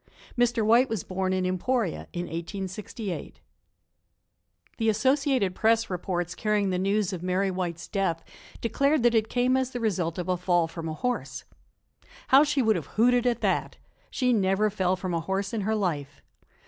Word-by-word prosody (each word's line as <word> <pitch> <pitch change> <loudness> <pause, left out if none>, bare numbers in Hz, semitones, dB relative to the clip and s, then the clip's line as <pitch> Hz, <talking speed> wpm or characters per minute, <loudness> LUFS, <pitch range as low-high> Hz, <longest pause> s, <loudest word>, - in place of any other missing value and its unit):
Mr. 240 -2 +2
White 235 +4 +5
was 220 -6 -2
born 185 0 -2
in 185 -1 0
Emporia 185 +3 -1
in 175 - -3
1868. 190 +3 -6 1.4
THE 225 -1 +1
Associated 260 -2 +2
Press 225 +1 +2
reports 175 -1 -2
carrying 210 0 0
the 180 - 0
news 195 0 0
of 180 - -5
Mary 185 +2 0
White's 175 -2 -4
death 170 -5 -1 0.4
declared 275 +4 +1
that 240 -1 +4
it 220 -1 +2
came 250 +1 +2
as 260 -1 +1
the 245 - -5
result 180 -7 -1
of 180 -1 -3
a 180 -1 +1
fall 175 -2 +2
from 165 0 -6
a 155 - -4
horse. 250 +9 -3 0.9
How 270 +2 +8
she 290 -3 +1
would 220 -1 +3
have - - -6
hooted 245 +2 +4
at 240 -2 0
that! - - 0 0.3
She 250 -2 +1
never 205 0 +2
fell 190 -2 +1
from 185 -1 -4
a 165 - +1
horse 195 +4 -2
in 225 - -1
her 220 +3 0
life. 145 -9 -3
200 Hz, 175 wpm, -27 LUFS, 180-235 Hz, 1.4 s, How